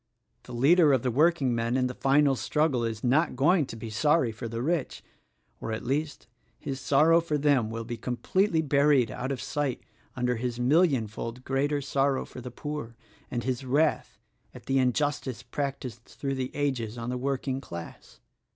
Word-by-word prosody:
The -, -, -11 dB
leader 145 Hz, +5 st, +5 dB
of 130 Hz, -, +2 dB
the 125 Hz, -, +1 dB
workingmen 130 Hz, -5 st, +2 dB
in 130 Hz, -, +2 dB
the 125 Hz, -, -2 dB
final 135 Hz, +1 st, +3 dB
struggle 150 Hz, -2 st, 0 dB
is 115 Hz, -2 st, -3 dB
not 145 Hz, +6 st, +2 dB
going 150 Hz, +3 st, +3 dB
to -, -, -7 dB
be 115 Hz, 0 st, -7 dB
sorry 145 Hz, +1 st, +2 dB
for 115 Hz, +2 st, -6 dB
the 115 Hz, +1 st, -4 dB
rich 160 Hz, -1 st, -2 dB, 0.3 s
— -, -, -43 dB
or, -, -, -4 dB
at 110 Hz, -, -4 dB
least, 145 Hz, +3 st, -2 dB, 0.3 s
his 135 Hz, -1 st, -5 dB
sor 140 Hz, +4 st, +3 dB
row 165 Hz, +1 st, +6 dB
for 155 Hz, -3 st, -1 dB
them 140 Hz, -6 st, +2 dB
will 115 Hz, +1 st, -4 dB
be 120 Hz, +1 st, -5 dB
completely 160 Hz, -, 0 dB
buried 140 Hz, -4 st, +3 dB
out 130 Hz, +2 st, -4 dB
of 135 Hz, -, -3 dB
sight 145 Hz, -2 st, -2 dB, 0.3 s
under 125 Hz, -1 st, 0 dB
his 120 Hz, 0 st, -3 dB
millionfold 125 Hz, -, +1 dB
greater 140 Hz, +2 st, 0 dB
sorrow 135 Hz, 0 st, 0 dB
for 125 Hz, -, -10 dB
the 125 Hz, -, -7 dB
poor 135 Hz, -2 st, -6 dB, 0.3 s
and 120 Hz, -1 st, -3 dB
his 130 Hz, 0 st, -2 dB
wrath 145 Hz, +5 st, +1 dB, 0.4 s
at -, -, -12 dB
the 135 Hz, 0 st, +2 dB
injustice 130 Hz, 0 st, 0 dB
practiced 125 Hz, -3 st, -4 dB
through 135 Hz, -1 st, -4 dB
the 130 Hz, -1 st, -2 dB
ages 125 Hz, -6 st, -2 dB
on 120 Hz, +1 st, -4 dB
the -, -, -2 dB
working 135 Hz, 0 st, -2 dB
class. 85 Hz, -9 st, -10 dB
130 Hz, 180 wpm, -28 LUFS, 120-145 Hz, 0.4 s, row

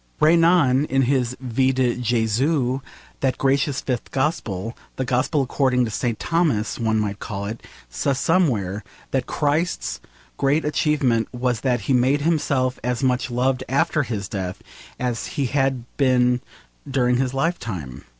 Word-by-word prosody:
Renan 165 Hz, -4 st, +4 dB
in 135 Hz, -2 st, +1 dB
his 125 Hz, -1 st, 0 dB
Vie 130 Hz, +1 st, +1 dB
de 130 Hz, -2 st, +1 dB
Jesus 125 Hz, +3 st, +1 dB, 0.4 s
that 130 Hz, -2 st, 0 dB
gracious 140 Hz, 0 st, +1 dB
fifth 125 Hz, -4 st, -3 dB
gospel, 115 Hz, -, -2 dB, 0.2 s
the 130 Hz, -, -2 dB
gospel 130 Hz, +4 st, +1 dB
according 130 Hz, -1 st, +1 dB
to 110 Hz, -, -4 dB
St. 115 Hz, +1 st, -1 dB
Thomas, 145 Hz, -11 st, 0 dB
one 110 Hz, -1 st, +1 dB
might 105 Hz, -1 st, -2 dB
call 100 Hz, -2 st, -5 dB
it 110 Hz, +3 st, -5 dB, 0.3 s
says 65 Hz, -, -1 dB
somewhere 115 Hz, -, +1 dB, 0.3 s
that 130 Hz, -2 st, 0 dB
Christ's 155 Hz, +4 st, -1 dB, 0.4 s
great 145 Hz, +3 st, +2 dB
achievement 140 Hz, -6 st, +1 dB
was 125 Hz, -2 st, -1 dB
that 125 Hz, -3 st, +1 dB
he 130 Hz, -, 0 dB
made 130 Hz, +3 st, +3 dB
himself 140 Hz, -5 st, +1 dB
as 125 Hz, +2 st, -1 dB
much 130 Hz, 0 st, +1 dB
loved 125 Hz, +1 st, 0 dB
after 155 Hz, +3 st, +2 dB
his 110 Hz, -7 st, -3 dB
death 95 Hz, -3 st, -5 dB, 0.4 s
as 125 Hz, -2 st, -2 dB
he 140 Hz, -, +1 dB
had 135 Hz, -2 st, 0 dB
been 125 Hz, -2 st, +3 dB, 0.5 s
during 125 Hz, -2 st, +2 dB
his 130 Hz, 0 st, -1 dB
lifetime. 105 Hz, -, -3 dB
130 Hz, 145 wpm, -22 LUFS, 115-140 Hz, 0.5 s, Renan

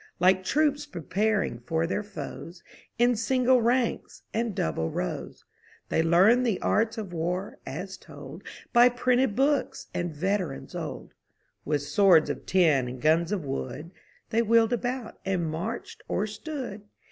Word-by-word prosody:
Like 185 Hz, +1 st, +4 dB
troops 295 Hz, +4 st, +1 dB
preparing 205 Hz, -, -1 dB
for 160 Hz, +7 st, -1 dB
their 185 Hz, +4 st, -1 dB
foes, 170 Hz, -2 st, -8 dB, 0.3 s
In 240 Hz, +1 st, +4 dB
single 250 Hz, +2 st, +3 dB
ranks 240 Hz, +1 st, 0 dB
and 225 Hz, -2 st, -1 dB
double 80 Hz, +1 st, -1 dB
rows. -, -, -5 dB, 0.4 s
They -, -, +2 dB
learned 190 Hz, +10 st, +5 dB
the 225 Hz, -6 st, 0 dB
arts 225 Hz, +2 st, +1 dB
of 200 Hz, -5 st, -5 dB
war, 180 Hz, +4 st, -3 dB
as 185 Hz, +7 st, -6 dB
told -, -, -11 dB, 0.3 s
By 240 Hz, 0 st, +7 dB
printed 245 Hz, -1 st, +1 dB
books 275 Hz, +2 st, 0 dB
and 175 Hz, -1 st, -2 dB
veterans 180 Hz, -1 st, -2 dB
old; -, -, -6 dB, 0.5 s
With 145 Hz, -1 st, 0 dB
swords 165 Hz, +2 st, +4 dB
of -, -, -8 dB
tin 155 Hz, -9 st, +3 dB
and 125 Hz, +1 st, -6 dB
guns 160 Hz, +6 st, +2 dB
of 190 Hz, -7 st, -2 dB
wood. 135 Hz, +4 st, -5 dB, 0.4 s
They 230 Hz, -, +3 dB
wheeled 230 Hz, +1 st, +4 dB
about, 245 Hz, 0 st, -3 dB
and 185 Hz, -3 st, -1 dB
marched 170 Hz, +9 st, -5 dB
or 205 Hz, -, 0 dB
stood. 225 Hz, -1 st, -6 dB
195 Hz, 145 wpm, -27 LUFS, 165-235 Hz, 0.5 s, By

